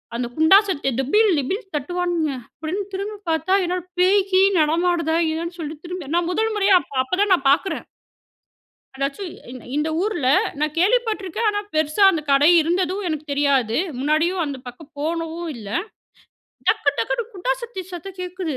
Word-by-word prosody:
அந்த 240 0 -2
குண்டா 320 +5 +7
சத்ததை 285 -8 -1
டிபில், 420 - +3
டிபில் 385 - -3
தட்டுவானுங்க. 340 +1 -1 0.3
அப்டின்னு 355 +6 -2
திரும்பி 405 +2 -4
பார்த்தா, 320 +3 +1
என்னடா 360 0 -2 0.2
பேய் 385 +2 +5
கீய் 380 +1 +5
நடமாடுதா? 330 +1 +1 0.2
என்னனு 335 +2 -4
சொல்லிட்டு 310 0 -6
திரும்பி 345 -5 -6
நான் 345 0 +1
1 445 +4 0
முறையா, 395 -1 +3
அப்-அப்பதான் 285 +10 -1
நான் 275 -6 +1
பார்க்குறேன். 375 +7 0 1.1
அதாச்சும் 280 +7 -3 0.2
இந் 255 -1 -9 0.2
இந்த 300 +1 0
ஊர்ல 350 -11 0 0.3
நான் 300 0 -1
கேள்விப்பட்டிருக்கேன். 430 0 +1
ஆனா, 410 0 -2
பெருசா 310 +5 +2
அந்த 315 -4 -2
கடை 280 +3 +5
இருந்ததும் 365 +4 0
எனக்குத் 305 -2 -4
தெரியாது. 275 -6 +2 0.2
முன்னாடியும் 320 +6 +1
அந்த 280 -2 -5
பக்கம் 280 +5 -11
போனதும் 330 +2 -3
இல்ல. 210 -3 -9 1.0
டக்கு 430 -10 +3
டக்குன்னு 265 - -1
குண்டா 395 +6 -1
சட்டி 450 -6 -6
சத்தம் 365 +2 -8
கேட்குது. 360 -5 -4
335 Hz, 150 wpm, -22 LUFS, 295-380 Hz, 1.1 s, குண்டா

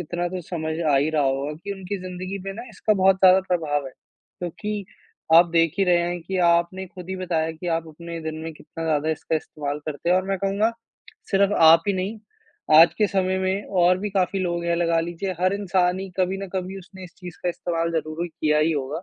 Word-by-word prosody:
इतना 175 +1 -3
तो 185 0 -5
समझ 160 -2 -3
आ 140 - +5
ही 145 +3 +2
रहा 155 -2 +1
होगा 135 +2 -1
कि 200 - -3
उनकी 195 0 -5
जिंदगी 185 +1 -5
पे 195 - -4
ना 230 - -7
इसका 215 +1 0
बहुत 190 -1 +4
ज़्यादा 190 0 +6
प्रभाव 150 -5 0
है। 130 - -9
क्योंकि 200 +8 -7 0.5
आप 170 +1 +8
देख 165 -1 +2
ही 195 - +4
रहे 175 -1 +4
हैं 175 +1 -2
कि 190 +3 -4
आपने 170 +3 +1
खुद 180 0 -11
ही 190 - -3
बताया 170 -3 -1
कि 160 +3 -9
आप 165 0 -5
अपने 170 +2 -8
दिन 160 0 -5
में 165 0 -5
कितना 165 +2 -8
ज़्यादा 155 0 +1
इसका 160 +1 -1
इस्तेमाल 145 -1 -5
करते 155 +2 -4
हैं 180 - +5
और 185 - +1
मैं 195 - 0
कहूँगा, 200 +4 +1 0.6
सिर्फ 200 0 +3
आप 165 0 +7
ही - - +3
नहीं, 195 +4 -3 0.6
आज 165 +1 +7
के 210 - +4
समय 190 -1 0
में 190 +2 -1 0.2
और 180 +1 +4
भी 205 +2 -3
काफ़ी 195 0 0
लोग 175 -1 -2
हैं 170 0 +1
लगा 170 -1 +2
लीजिए 175 +3 -3
हर 185 +1 +3
इंसान 185 -2 +1
ही 195 0 -6
कभी 185 +1 +1
ना 195 - -5
कभी 190 +1 -3
उसने 190 0 -12
इस 180 - -13
चीज़ 180 -2 -9
का 180 - 0
इस्तेमाल 170 -1 -2
ज़रूर 155 0 -2
ही 175 - -3
किया 150 -2 0
ही 155 +2 +2
होगा। 145 +3 -3
175 Hz, 230 wpm, -24 LUFS, 160-190 Hz, 0.6 s, आप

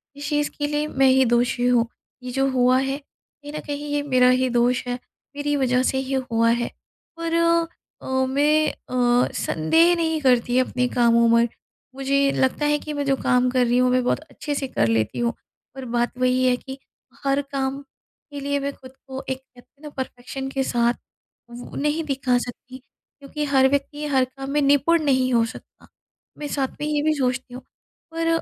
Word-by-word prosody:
इस 285 0 -6
चीज़ 295 0 0
के 290 -1 -1
लिए 295 +1 -1
मैं 270 -2 +2
ही 260 0 +4
दोषी 245 +1 +1
हूँ, 240 -2 +3 0.4
ये 250 - -5
जो 270 +1 +1
हुआ 255 0 +3
है, 270 +1 -1
कहीं 290 0 -16
न 305 - -4
कहीं 290 0 -4
ये 290 - +1
मेरा 255 -3 +4
ही 255 0 +2
दोष 245 +1 +2
है, 245 - -1 0.4
मेरी 290 0 -1
वजह 255 -2 +2
से 265 - -2
ही 265 0 -3 0.2
हुआ 230 0 +3
है। 240 0 0 0.5
पर 335 0 -2 0.7
अ, 260 0 0
मैं 295 +3 +2
अ, 245 -1 +1
संदेह 325 - +3
नहीं 320 -2 0
करती 245 -2 +2
अपने 250 -1 0
कामों 235 -1 +4
में। 235 0 +4 0.5
मुझे 275 +1 +1
लगता 260 +3 0
है 295 0 +3
कि 305 - -6
मैं 285 -1 -2
जो 275 - +2
काम 250 0 +3
कर 255 -1 +2
रही 240 +1 +2
हूँ, 250 0 +3
मैं 255 0 +2
बहुत 245 - +1
अच्छे 295 -1 -6
से 275 -1 -2
कर 115 - 0
लेती 110 - 0
हूँ। 235 0 0 0.4
पर 265 -1 -7
बात 240 +1 0
वही 255 0 +2
है 250 -1 +4
कि 265 +1 -9 0.5
हर 275 +1 +1
काम 275 0 -2 0.5
के 285 - -6
लिए 285 0 -1
मैं 280 0 -2
ख़ुद 260 -1 -14 0.2
को, 265 0 -6
एक 260 - -1
कहते 260 -1 -22
हैं 285 - -33
ना, 300 - -7
परफेक्शन 265 0 -6
के 270 0 -1
साथ 240 -1 +1 0.6
वो 240 +1 -10
नहीं 300 +3 0
दिखा 265 -3 +1
सकती 250 +1 -7 0.4
क्योंकि 290 +2 -5
हर 270 -2 +4
व्यक्ति 285 +2 -2
हर 265 -3 +2
काम 270 +1 -9
में 295 +1 +1
निपुण 285 +4 +3
नहीं 260 -3 +2
हो 230 -1 +4
सकता। 225 - -12 0.5
मैं 295 - -5
साथ 275 -2 -1
में 295 - -1
ये 300 -1 0
भी 310 0 +3
सोचती 255 -2 -2
हूँ, 255 - -8 0.5
पर 330 0 -2
265 Hz, 200 wpm, -23 LUFS, 250-285 Hz, 0.7 s, ही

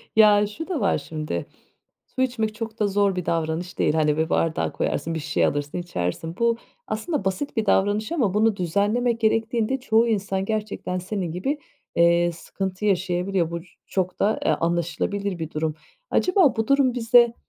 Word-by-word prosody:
Ya, 210 -1 +6
şu 290 +11 -7
da 360 -6 -2
var 200 - +2
şimdi. 150 - -4 0.7
Su - - 0
içmek 225 -4 0
çok 225 0 -6
da 210 - +3
zor 200 -1 +2
bir 180 -2 -3
davranış 165 +2 -2
değil. - - +3
Hani, 155 -1 +2
bir 160 +1 0
bardağa 165 -1 +1
koyarsın, 165 0 -2
bir - - -2
şişeye 145 - +1
alırsın, 145 +2 -2
içersin. 165 - -3
Bu 235 0 +2 0.3
aslında 305 - -2
basit 190 +9 -2
bir 220 - +1
davranış 205 +6 +2
ama 245 - +1
bunu 215 +1 +3
düzenlemek 205 +7 +1
gerektiğinde 225 +3 +1
çoğu 230 -2 +3
insan 195 -3 -1
gerçekten 215 -3 -3
senin 185 -1 -3
gibi, 230 - -2 0.4
eee, 170 0 +4
sıkıntı 190 +4 -5
yaşayabiliyor. 180 -2 +1
Bu 170 - -3 0.3
çok 185 -1 -2
da, 215 +2 +2
eee, - - +4
anlaşılabilir 175 +3 -1
bir 160 -1 -4
durum. 155 0 -2 0.3
Acaba 365 - +3
bu 225 -1 -1
durum 275 -2 +3
bize 235 0 +5
200 Hz, 170 wpm, -24 LUFS, 170-225 Hz, 0.7 s, Ya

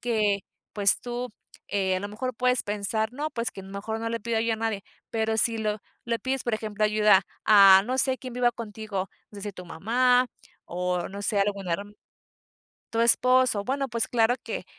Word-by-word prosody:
que, 215 -4 +1 0.3
pues, 200 -2 +2
tú, 245 -1 -5 0.3
eh, 190 -2 0
a - - -3
lo 205 - -4
mejor 255 +5 -4
puedes 250 +1 +2
pensar, 210 +2 -2
¿no?, 295 +4 -3
pues, 235 -3 -2
que 195 - -10
mejor 200 +3 -5
no 230 0 -3
le 230 0 -3
pida 225 0 -1
yo 230 0 0
a - - -1
nadie, 220 -3 -3 0.3
pero 220 0 0
si 225 0 +3
lo 215 -1 -1 0.3
le 235 -1 -1
pides, 265 0 -2
por 240 - 0
ejemplo, 215 -1 -2
ayuda 210 -2 +4 0.2
a, 195 -2 +8
no 255 +3 -2
sé, 260 0 +3
quien 255 -2 -8
viva 245 -1 +2
contigo, 210 -4 -5 0.2
no 205 - -13
sé - - -9
si - - -6
tu 180 -1 -10
mamá 245 +8 +2 0.4
o, 180 0 -2
no 200 +1 -7
sé, 200 0 +1
algún 200 -2 -1
herm 200 +5 -3 1.0
tu 230 0 +1
esposo, 250 -2 +4
bueno, 270 +4 -1
pues, 230 0 0
claro 235 +1 +2
que - - -5
220 Hz, 200 wpm, -26 LUFS, 200-240 Hz, 1.0 s, a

